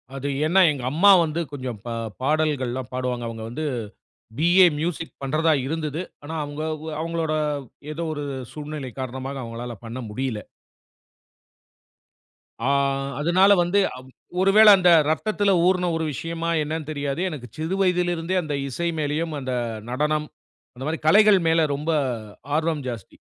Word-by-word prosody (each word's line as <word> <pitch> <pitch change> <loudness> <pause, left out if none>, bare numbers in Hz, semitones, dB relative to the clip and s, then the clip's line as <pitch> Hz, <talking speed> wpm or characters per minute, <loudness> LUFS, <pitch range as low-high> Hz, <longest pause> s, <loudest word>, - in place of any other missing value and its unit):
அது 140 +1 -4 0.2
ஏனா 185 +4 +4
எங்க 135 -4 -5
அம்மா 185 +7 +5 0.2
வந்து 160 +1 -3
கொஞ்சம் 130 -6 -5
பா 120 - -4 0.3
பாடல்கள்லாம் 135 -4 0
பாடுவாங்க. 125 -2 -2
அவங்க 115 -1 -7
வந்து, 145 +7 -5 0.7
பி.ஏ 175 +3 +6
மியூசிக் 165 0 -3
பண்ணுறதா 155 +4 +2
இருந்தது. 155 +1 -3 0.2
ஆனா 160 +3 -6
அவங்க 145 +1 -6 0.4
அவங்களோட 165 -1 -2 0.6
ஏதோ 170 +2 -4
ஒரு 145 - -5 0.3
சூழ்நிலை 150 -3 -6
காரணமாக 130 +2 -5
அவங்களால 120 +1 -6
பண்ண 120 +3 -6
முடியல. 125 0 -3 2.2
ஆ, 120 - -2 0.5
அதனால 185 +6 +5
வந்து 175 +4 +2 0.6
ஒருவேளை 210 +3 +7
அந்த 180 -2 +4 0.2
இரத்தத்தில 200 +6 +1
ஊறின 180 -1 +2
ஒரு 160 - -1
விஷயமா 165 +4 -3
என்னன்னு 155 0 -4
தெரியாது. 145 0 -3
எனக்கு 140 -7 -7
சிறு 160 +5 -2
வயதில 180 -2 +2
இருந்தே 165 +3 -2
அந்த 150 -3 -4
இசை 170 +6 -2
மேலயும் 155 +2 -1
அந்த 130 -1 -4 0.4
நடனம், 150 +3 0 0.5
அந்த 130 +2 -8
மாதிரி 160 - -2
கலைகள் 205 +3 +6
மேல 160 -1 +3
ரொம்ப 150 +4 -3 0.7
ஆர்வம் 155 -3 -1
ஜாஸ்தி. 115 -6 -7
155 Hz, 135 wpm, -24 LUFS, 135-170 Hz, 2.2 s, ஒருவேளை